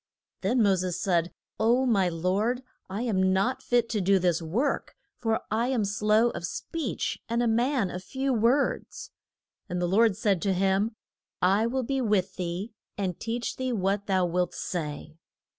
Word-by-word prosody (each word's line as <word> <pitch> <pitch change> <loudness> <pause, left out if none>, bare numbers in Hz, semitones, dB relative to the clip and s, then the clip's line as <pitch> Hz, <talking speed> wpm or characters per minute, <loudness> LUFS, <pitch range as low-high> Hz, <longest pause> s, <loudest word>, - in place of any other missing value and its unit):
Then 245 -2 +2
Mo 200 -2 +5
ses 180 -1 -2
said, 175 -2 +1 0.3
O, 240 +4 +3
my 195 -7 +3
Lord, 195 +9 0 0.3
I 200 +5 -3
am 190 -5 +2
not 195 +8 +1
fit 240 -1 +2
to 210 - 0
do 195 +1 +4
this 175 -2 +1
work, 220 - -1 0.2
for 225 -2 0
I 225 +3 +1
am 250 -5 +1
slow 210 +3 +2
of - - -6
speech, 290 - -3
and 235 +1 +1
a - - +2
man 235 -2 +1
of 180 +1 -6
few 265 +6 -1
words. 240 +5 0 0.6
And 180 - -2
the 175 - +1
Lord 200 +2 +3
said 200 -5 +1
to 195 -2 +1
him, 195 +4 +1 0.4
I 195 +5 +3
will 260 +2 -1
be 270 +2 -1
with 200 -5 +1
thee, 180 +5 -4 0.2
and 185 -4 -2
teach 235 +1 -3
thee 260 -1 -1
what 200 0 0
thou 190 -2 +2
wilt 175 0 -1
say. 155 -2 -5
205 Hz, 175 wpm, -27 LUFS, 185-235 Hz, 0.6 s, Mo